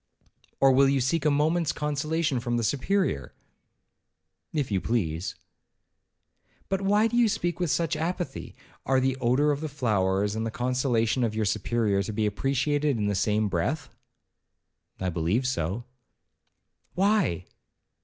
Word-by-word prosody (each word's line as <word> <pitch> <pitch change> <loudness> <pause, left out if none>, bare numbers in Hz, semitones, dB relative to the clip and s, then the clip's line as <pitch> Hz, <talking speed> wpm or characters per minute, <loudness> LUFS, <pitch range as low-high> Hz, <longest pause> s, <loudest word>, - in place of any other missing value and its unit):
'Or 135 0 +6
will 135 +1 +5
you 135 0 +2
seek 155 +6 0
a - - +5
moment's 155 +3 +2
consolation 150 -1 -1
from 120 0 -1
the 120 - -1
Superior?' 140 - 0 1.2
'If 145 -7 -2
you 95 -2 +1
please.' 85 -5 -1 1.3
'But 195 0 0
why 205 +2 +3
do 230 - -1
you 240 -2 +4
speak 175 -5 -2
with 175 -2 0
such 165 +2 0
apathy? 165 -2 -4 0.3
are 130 0 +2
the 130 0 +1
odour 130 +4 +2
of 145 0 -2
the 155 - -3
flowers, 105 -6 0
and 110 - -2
the 115 - -1
consolations 125 0 0
of 110 -2 -1
your 110 -1 0
Superior, 105 0 0
to 105 +3 -4
be 110 +1 0
appreciated 140 +5 0
in 105 - -1
the - - 0
same 105 +2 +1
breath?' 100 - -2 1.1
'I 95 - -1
believe 85 +10 0
so.' 105 -2 -2 1.1
'Why?' 190 - +2
130 Hz, 145 wpm, -27 LUFS, 105-155 Hz, 1.3 s, Or